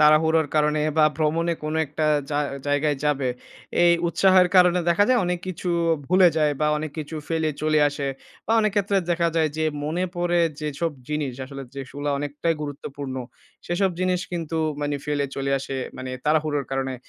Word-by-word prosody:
তাড়াহুড়োর 155 +1 +5
কারণে 150 0 +2 0.2
বা 155 - +7
ভ্রমণে 165 +2 +1
কোন 155 +1 -3
একটা 155 +2 -3 0.3
জা 145 - 0 0.3
জায়গায় 145 0 +1
যাবে, 140 -3 +1 0.5
এই 175 0 +6 0.2
উৎসাহের 185 0 +5
কারণে 180 -1 +6
দেখা 170 +4 +4
যায় 255 -1 +4
অনেক 180 0 -1
কিছু 185 0 -4 0.4
ভুলে 185 +2 +6
যায় 150 -1 +3
বা 150 - +3
অনেক 155 0 -4
কিছু 155 +1 -5
ফেলে 160 -1 0
চলে 155 0 +3
আসে 145 -1 -4 0.4
বা 220 - +1
অনেক 215 - +2
ক্ষেত্রে 200 0 +2
দেখা 170 0 +2
যায় 160 -1 +3
যে, 160 - 0 0.2
মনে 170 +4 -1
পড়ে 175 0 +1 0.2
যেসব 150 +2 -2 0.2
জিনিস, 150 -3 -2
আসলে 135 +1 -8
যেগুলা 140 +2 -4
অনেকটাই 145 +3 -1
গুরুত্বপূর্ণ। 140 -1 -6 0.5
সেসব 190 +3 +1
জিনিস 185 -1 +1
কিন্তু 165 -2 -3 0.2
মানে 145 0 -1
ফেলে 145 -1 0
চলে 135 0 -1
আসে 135 0 -6 0.2
মানে 130 0 -6
তাড়াহুড়োর 150 -2 +1
কারণে। 135 -1 -2
155 Hz, 170 wpm, -24 LUFS, 145-175 Hz, 0.5 s, বা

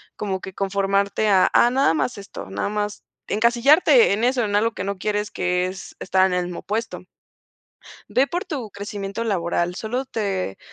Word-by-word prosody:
como 190 -3 -3
que 190 - -8
conformarte 200 +2 0
a 190 -2 +5
a 240 - +6
nada 265 -8 +3
más 165 +10 -1
esto, 200 - -9
nada 100 - -2
más 210 0 -3 0.2
encasillarte 240 - +4
en 215 +3 -1
eso, 250 0 +2
en 205 -1 -1
algo 225 +2 +2
que 185 - -5
no 200 0 -3
quieres 210 +1 -2
que 180 0 0
es 185 0 -8
estar 190 0 +2
en 185 - -2
el 180 0 0
mismo 175 -1 -6
puesto. 210 -3 -4 1.0
Ve 265 - +2
por 350 +4 -3
tu 260 - -5
crecimiento 200 +1 -5
laboral, 175 -4 -1
solo 240 +7 -3
te 195 - -3
200 Hz, 180 wpm, -22 LUFS, 190-230 Hz, 1.0 s, a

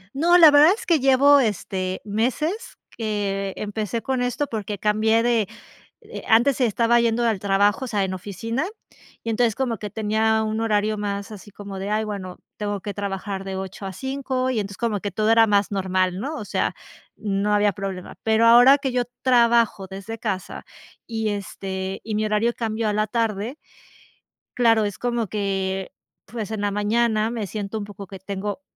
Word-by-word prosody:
No, 345 +5 +5
la 320 -4 +9
verdad 300 +5 +7
es 475 - -9
que 330 -4 +3
llevo, 275 +2 +6
este, 190 -4 -2
meses 265 - -2
que 200 -3 -2
empecé 215 +2 -3
con 260 -2 -1
esto 245 +4 -1
porque 210 -4 -4
cambié 220 +3 +2
de, 230 -4 +2 0.5
eh, 450 +1 -9
antes 240 +4 +4
estaba 235 +1 +3
yendo 235 0 +1
al 220 -4 +1
trabajo, 200 +4 +2
o - - -6
sea, 205 -4 0
en 185 0 -2
oficina, 225 - -3 0.6
y 230 - -3
entonces 225 0 +2
como 245 -5 -1
que 205 0 -7
tenía 220 0 +1
un 220 +1 -2
horario 215 -1 +1
más 200 +1 -4
así 205 0 -11
como 200 -1 -8
de, 195 +2 -4
"ay, 215 +1 0
bueno, 190 -3 -6 0.2
tengo 205 -2 -3
que 205 0 -6
trabajar 195 -1 -4
de 190 -1 -5
8 190 +1 -6
a 190 - -5
5" 265 0 -2
y 250 - -1
entonces 200 -1 -5
como 225 -4 -1
que 205 0 -4
todo 215 +3 0
era 225 0 +6
más 205 -2 +2
normal, 185 -1 0
¿no?, 290 +7 -4
o 210 - -6
sea, - - -1 0.4
no 205 0 -1
había 205 -1 +3
problema, 190 -1 -6
pero 220 +1 +3
ahora 245 +4 +8
que 270 -2 -2
yo 245 0 +1 0.2
trabajo 235 -5 +3
desde 195 +4 -7
casa, 195 -4 -4 0.4
y, 220 -2 -2
este, 190 -1 -4
y 215 -1 -3
mi 215 0 0
horario 215 +3 +1
cambió 225 -1 -2
a 210 - 0
la 215 +1 +1
tarde, 225 +3 -2 1.0
claro, 225 -3 +3
es 205 -2 -3
como 240 -3 -1
que, 195 -2 -2 0.3
pues, 220 0 -6
en 220 - -3
la 205 0 0
mañana 215 +1 +1
me 220 -4 -3
siento 210 +1 -4
un 205 - -5
poco 200 -1 -9
que 195 0 -10
tengo, 200 +6 -5
215 Hz, 185 wpm, -23 LUFS, 200-235 Hz, 1.0 s, la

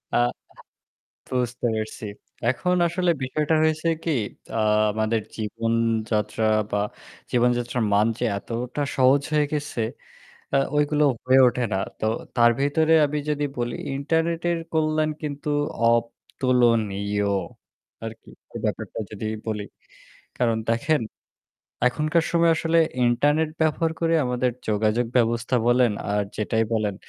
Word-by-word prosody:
আ - - +5 1.1
বুঝতে 125 -1 -2
পারসি। 110 +2 -5 0.4
এখন 155 +9 +1
আসলে 175 +1 +1
বিষয়টা 150 +4 0
হয়েছে 155 +1 +1 0.2
কি 165 - 0 0.5
আ - - +1 0.3
আমাদের 110 +1 0 0.2
জীবনযাত্রা 115 0 -1 0.3
বা - - +1 0.5
জীবনযাত্রার 120 0 +1
মান 105 +2 +4
যে 125 - 0
এতটা 120 +7 -4
সহজ 130 +2 +4
হয়ে 150 -1 +3
গেছে 145 -5 -2 0.7
আ - - +6 0.2
ওইগুলো 150 0 +2 0.2
হয়ে 130 +1 +5
ওঠে 125 0 0
না - - +1 0.2
তো - - -2 0.3
তার 120 -1 +6
ভিতরে 155 +3 +2
আমি 150 +1 -2
যদি 150 -1 0
বলি 120 -1 -2 0.2
ইন্টারনেটের 165 +4 0 0.2
কল্যাণ 155 -1 +1
কিন্তু 145 -1 -4 0.4
অতুলনীয় 115 -4 +1 0.8
আর 115 - -4
কি - - -18 0.4
ব্যাপারটা - - -3
যদি 105 0 -6 0.2
বলি, 105 -2 -2 0.8
কারণ 115 -2 +2
দেখেন 145 +6 +1 0.9
এখনকার 155 +5 +1
সময় 170 -1 +4
আসলে 165 +1 +2 0.3
ইন্টারনেট 145 +6 +2
ব্যবহার 160 +1 +1
করে 165 0 +2
আমাদের 125 0 0 0.2
যোগাযোগ 110 +3 +1
ব্যবস্থা 115 +1 +2
বলেন 120 -1 +4 0.2
আর 105 0 +1
যেটাই 110 +1 0
বলেন 105 -3 0
125 Hz, 120 wpm, -24 LUFS, 115-150 Hz, 1.1 s, আ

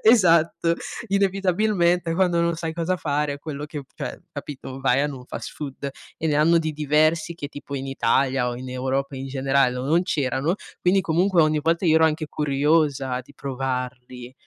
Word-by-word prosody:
E - - +4
esatto, 170 -6 +4 0.3
inevitabilmente 190 -3 +2
quando 175 -2 +2
non 170 0 +1
sai 165 -1 -3
cosa 170 +2 -1
fare 145 -2 -1
quello 145 0 -6
che 150 -1 -6
cioè - - -5
capito, 135 -2 -7
vai 135 0 +3
a - - +2
n 145 - -5
un 125 -2 -10
fast - - -6
food 140 -1 -6 0.3
e 160 - -2
ne 150 - +1
hanno 160 +3 +4
di 160 -1 0
diversi 155 +2 +2
che 145 -4 -6
tipo 145 0 -8
in 135 0 -4
Italia 130 0 +1
o 120 - -4
in 130 +1 -7
Europa 135 +2 -2
in 135 +1 -5
generale, 135 -1 +2
no 125 +1 -3
non 165 +5 +3
c'erano, 145 -1 0 0.3
quindi 185 +2 +3
comunque 175 +1 +3
ogni 155 0 +2
volta 165 +4 +1
io 160 - +5
ero 160 - +5
anche 155 0 +1
curiosa 145 -3 +1
di 145 +3 -19
provarli, 125 -2 -5
150 Hz, 185 wpm, -24 LUFS, 135-170 Hz, 0.3 s, io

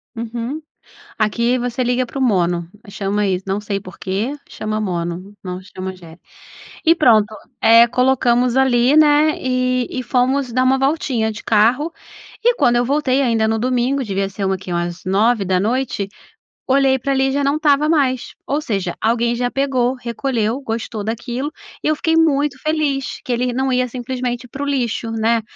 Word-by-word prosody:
Uhum, 235 +6 -4 0.6
aqui 235 +3 +1
você 245 +1 -2
liga 250 +1 0
pro 270 - -6
Mono, 175 -8 +1 0.2
chama 200 +1 -1
isso, 185 -1 -1
não 195 +2 -1
sei 200 -1 -3
por 185 -2 -12
quê, 200 +7 -2 0.2
chama 215 0 -3
Mono, 180 0 -4
não 180 -1 -5
chama 190 0 -7
Agere. 175 -2 -13 0.7
E 330 +1 +6
pronto, 225 -9 +5 0.3
eh, 230 +1 +7
colocamos 250 -1 +2
ali, 260 0 +3
né, 305 0 +5
e 255 -1 0
e 255 - -3
fomos 255 0 0
dar 255 - +2
uma 265 +1 +3
voltinha 270 -5 0
de 215 0 -7
carro, 240 +9 +2 0.5
e 480 +1 +3
quando 240 - +3
eu 240 - +2
voltei, 275 0 +1
ainda 225 -4 +2
no 225 0 0
domingo, 255 +3 0
devia 195 -4 -2
ser 195 0 -4
uma 190 0 +1
quê? 185 -1 -8
Umas 175 +1 -3
21h, 205 +2 +1 0.6
olhei 265 0 +3
pra 275 +2 -1
ali, 270 0 +2
já 285 +1 0
não 280 +2 +2
estava 300 -1 +3
mais. 270 -6 +1
Ou 285 +2 0
seja, 195 -7 -2
alguém 235 +1 +1
já 245 +1 -1
pegou, 260 -2 0
recolheu, 240 -1 -2
gostou 225 -2 -4
daquilo 240 +6 -3 0.3
e - - +2
eu 310 - +2
fiquei 325 +2 0
muito 295 -3 +2
feliz 295 -4 -1
que 250 - -3
ele 245 +1 0
não 265 +2 0
ia, 250 0 +2
simplesmente, 250 0 -4
pro 280 +4 -5
lixo, 245 -5 -1
né. 225 +1 +1
245 Hz, 170 wpm, -19 LUFS, 215-270 Hz, 0.7 s, eh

